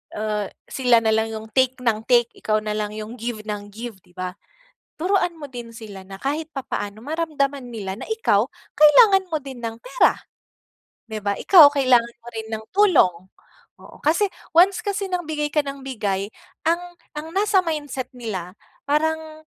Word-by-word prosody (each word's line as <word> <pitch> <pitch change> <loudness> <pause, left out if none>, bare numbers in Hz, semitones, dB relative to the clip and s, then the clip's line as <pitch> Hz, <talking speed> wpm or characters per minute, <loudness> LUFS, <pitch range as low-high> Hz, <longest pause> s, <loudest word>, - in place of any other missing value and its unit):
ah, 210 -1 -2 0.2
sila 245 -3 +3
nalang 220 0 +2
yung 220 0 -6
take 260 +2 +2
nang 220 -3 +1
take, 240 -2 +4
ikaw 215 0 0
nalang 210 0 -3
yung 215 +1 -6
give 230 -2 -4
nang 210 -1 -5
give, 220 0 -8
di 175 - -26
ba? 185 0 -4 0.6
Turuan 360 0 +1
mo 310 - -9
din 240 -2 -7
sila 210 -4 -9
na 195 - -8
kahit 295 +7 -3
papaano 215 -4 -4
maramdaman 285 -4 -1
nila 200 -3 -6
na - - -7
ikaw 445 0 +2 0.2
kailangan 385 +4 +6
mo 320 - -1
din 265 -3 -8
ng 225 -1 -4
pera, - - +2 0.9
'di 215 -2 -6
ba? 200 - +1
Ikaw 315 -7 +8
kailangan 250 -4 +3
mo 230 - -22
rin 220 0 -5
ng 220 0 -4
tulong. 360 - +4 0.7
Oo, - - -14
kasi 345 +6 +2 0.2
once 375 +4 +6
kasi 405 -2 -3
ng 355 -3 -2
bigay 300 -1 -2
ka 300 - +2
nang 275 -2 -4
bigay, 205 -6 -2 0.3
ang 350 +2 -1 0.2
ang 300 +1 -6
nasa 400 0 +3
mindset 295 -7 -3
nila, 195 -6 -5 0.3
parang 315 +1 -1
260 Hz, 165 wpm, -23 LUFS, 215-320 Hz, 0.9 s, Ikaw